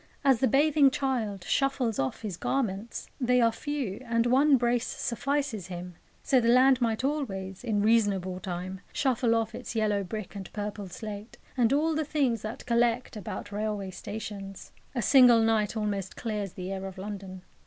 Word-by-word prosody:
As 270 -4 +4
the 260 - +3
bathing 285 +2 +5
child 240 -8 -2
shuffles 265 0 0
off 135 +11 -2
his 205 -5 -3
garments 225 0 -2
they 250 -1 +3
are 230 -1 +4
few, 255 -4 -4
and 230 0 +2
one 270 +3 +5
brace 240 0 +1
suffices 250 - -2
him 180 0 -7 0.3
so 260 -2 +3
the 230 - 0
land 255 +1 +5
might 225 0 0
always, 195 -10 -3
in 210 -4 0
reasonable 200 -5 +2
time, 185 +1 -5
shuffle 250 -4 +1
off 225 -1 -1
its - - -7
yellow 210 -2 +1
brick 210 +2 -6
and 195 -2 -7
purple 205 -2 -5
slate, 210 +3 -8 0.2
and 240 -3 +3
all 310 +3 +2
the 315 0 0
things 275 -6 0
that 215 +2 -6
collect 240 0 +1
about 205 0 -6
railway 205 -2 -3
stations. 195 0 -7 0.2
A 240 - 0
single 245 -2 +7
night 220 -1 +1
almost 200 -3 -2
clears 210 -5 -3
the 185 0 -6
air 195 0 -4
of 190 0 -9
London. 190 -2 -7
220 Hz, 170 wpm, -28 LUFS, 195-250 Hz, 0.3 s, single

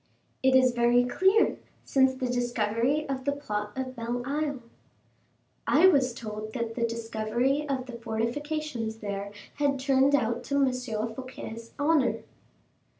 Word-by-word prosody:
"It 265 0 +4
is 260 -1 +6
very 240 +1 +4
clear, 380 - +3 0.3
since 265 -1 +3
the 260 0 -3
discovery 245 +4 0
of 265 -1 -3
the 285 - +1
plot 210 -7 -4
of 260 -1 -4
Belle 240 +1 -3
Isle." 285 -2 -2 1.0
"I 315 +5 +5
was 260 -8 +2
told 215 -1 -6
that 235 -2 -3
the 235 0 0
discovery 230 +5 -1
of 260 -2 -1
the 250 - -9
fortifications 235 +1 -3
there 200 -2 -5 0.3
had 280 -2 +2
turned 270 +1 +4
out 235 -2 0
to 280 - -2
M. 270 -2 +3
Fouquet's 230 -1 -5
honor." 275 -7 +2
250 Hz, 140 wpm, -28 LUFS, 230-275 Hz, 1.0 s, is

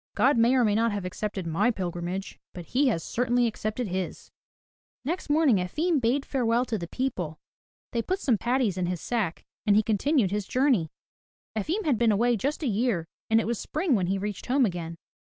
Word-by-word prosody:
"God 280 - +4
may 235 +2 +4
or 255 - +4
may 210 - +2
not 230 +2 +2
have 200 -2 -3
accepted 195 0 -4
my 165 +8 +2
pilgrimage, 180 -2 -4
but 175 -2 -8
He 270 - +2
has 170 -10 0
certainly 245 0 +1
accepted 220 +1 -2
his." 185 0 -4 0.7
Next 335 +2 -3
morning 295 -7 +4
Efim 300 - 0
bade 255 +4 +1
farewell 245 -2 +1
to 225 -4 -2
the 170 - -5
people, 180 - -3 0.5
they 235 - 0
put 370 +11 -1
some 255 - +2
patties 240 -6 +1
in 180 - 0
his 180 -1 -2
sack, 215 -7 -2 0.2
and 205 - +5
he 215 - +5
continued 220 - +2
his 205 -1 -2
journey. 250 - +2 0.7
Efim 335 - -1
had 275 -7 +2
been 235 -2 +4
away 235 +4 +3
just 280 - -2
a - - 0
year, 220 -6 0 0.2
and 225 0 +5
it - - -1
was 235 -1 -1
spring 315 0 -1
when 190 -6 +2
he 195 +2 0
reached 205 0 -5
home 265 +1 +3
again. 170 -4 -4
225 Hz, 200 wpm, -27 LUFS, 190-255 Hz, 0.7 s, and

